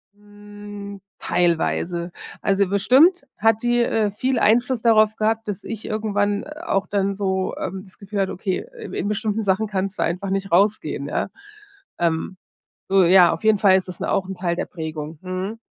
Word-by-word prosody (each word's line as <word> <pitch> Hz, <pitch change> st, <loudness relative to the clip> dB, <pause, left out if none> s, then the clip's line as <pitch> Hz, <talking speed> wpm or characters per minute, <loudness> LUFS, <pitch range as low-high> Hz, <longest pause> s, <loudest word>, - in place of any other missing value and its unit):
Hm, 205 Hz, -1 st, -11 dB, 0.2 s
teilweise. 170 Hz, 0 st, 0 dB, 0.3 s
Also 195 Hz, 0 st, +2 dB
bestimmt 270 Hz, -, +4 dB, 0.2 s
hat 225 Hz, 0 st, +3 dB
die, 240 Hz, 0 st, +2 dB
äh, 220 Hz, -3 st, +1 dB
viel 255 Hz, +5 st, -1 dB
Einfluss 235 Hz, +3 st, +2 dB
darauf 215 Hz, -2 st, +4 dB
gehabt, 220 Hz, +1 st, 0 dB
dass 205 Hz, -1 st, -4 dB
ich 225 Hz, -2 st, -6 dB
irgendwann 205 Hz, -1 st, -1 dB
auch 300 Hz, -, -2 dB
dann 200 Hz, -1 st, -1 dB
so, 190 Hz, -1 st, -1 dB
ähm, 190 Hz, +1 st, -4 dB
das 190 Hz, -2 st, -19 dB
Gefühl 200 Hz, 0 st, -5 dB
hatte: 195 Hz, -1 st, 0 dB
„Okay, 190 Hz, -, -3 dB
in 445 Hz, -, -8 dB
in -, -, -2 dB
bestimmten 210 Hz, +1 st, -1 dB
Sachen 200 Hz, +1 st, +1 dB
kannst 195 Hz, 0 st, -3 dB
du -, -, +1 dB
einfach 185 Hz, +4 st, -2 dB
nicht 195 Hz, 0 st, -2 dB
rausgehen, 200 Hz, +5 st, +1 dB
ja?“ -, -, -2 dB, 0.7 s
Ähm. 170 Hz, +2 st, -1 dB, 0.5 s
So 195 Hz, -1 st, +5 dB
ja, 180 Hz, 0 st, +6 dB
auf -, -, -7 dB
jeden 215 Hz, -2 st, +4 dB
Fall 190 Hz, -2 st, +6 dB
ist 190 Hz, -, -3 dB
das 180 Hz, -, -9 dB
auch 190 Hz, -, 0 dB
'n 190 Hz, -, -5 dB
Teil 175 Hz, -1 st, -1 dB
der -, -, -2 dB
Prägung. 155 Hz, -2 st, -6 dB
Mhm. 185 Hz, +4 st, -4 dB
200 Hz, 175 wpm, -22 LUFS, 190-215 Hz, 0.7 s, ja